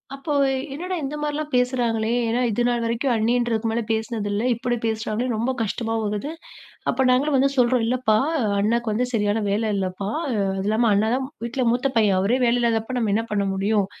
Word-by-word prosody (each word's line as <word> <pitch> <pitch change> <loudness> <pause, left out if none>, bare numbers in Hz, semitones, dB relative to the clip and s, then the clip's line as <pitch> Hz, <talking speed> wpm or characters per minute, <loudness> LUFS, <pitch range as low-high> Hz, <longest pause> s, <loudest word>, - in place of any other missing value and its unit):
அப்போ 275 -1 +1 0.2
என்னடா 360 +6 -4
இந்த 280 +2 -3
மாரிலாம் 300 0 -3
பேசுறாங்களே, 240 -3 +1 0.2
ஏன்னா 235 +2 0
இதுநாள் 240 +2 0
வரைக்கும் 235 +3 0
அண்ணின்றதுக்கு 230 0 +1
மேல 235 +1 0
பேசுனது 220 -1 -2
இல்ல. 210 +3 -1
இப்டி 240 +1 -2
பேசுறாங்களேன்னு 225 +2 -1
ரொம்ப 235 +4 0
கஷ்டமா 225 +2 -3
ஆகுது. 210 +9 -3 0.6
அப்ப 265 +2 +1
நாங்களும் 275 +3 +2
வந்து 275 +1 +3
சொல்றோம், 245 -1 +3
"இல்லப்பா, 245 -3 +2 0.4
அண்ணாக்கு 230 +2 +1
வந்து 245 +4 0
சரியான 210 0 +1
வேல 215 +2 0
இல்லப்பா. 190 +1 -3 0.2
அது 195 -6 -1
இல்லாம 220 +1 +2
அண்ணாதான் 225 +6 +1 0.2
வீட்ல 245 +2 -1
மூத்த 250 +3 +1
பையன். 205 -4 +4
அவரே 220 +7 +2
வேலையில்லாதப்ப 235 0 +1
நம்ம 220 -4 0
என்ன 225 +1 +1
பண்ண 200 -1 +1
முடியும்?" 200 +1 +1
230 Hz, 165 wpm, -23 LUFS, 215-250 Hz, 0.6 s, பையன்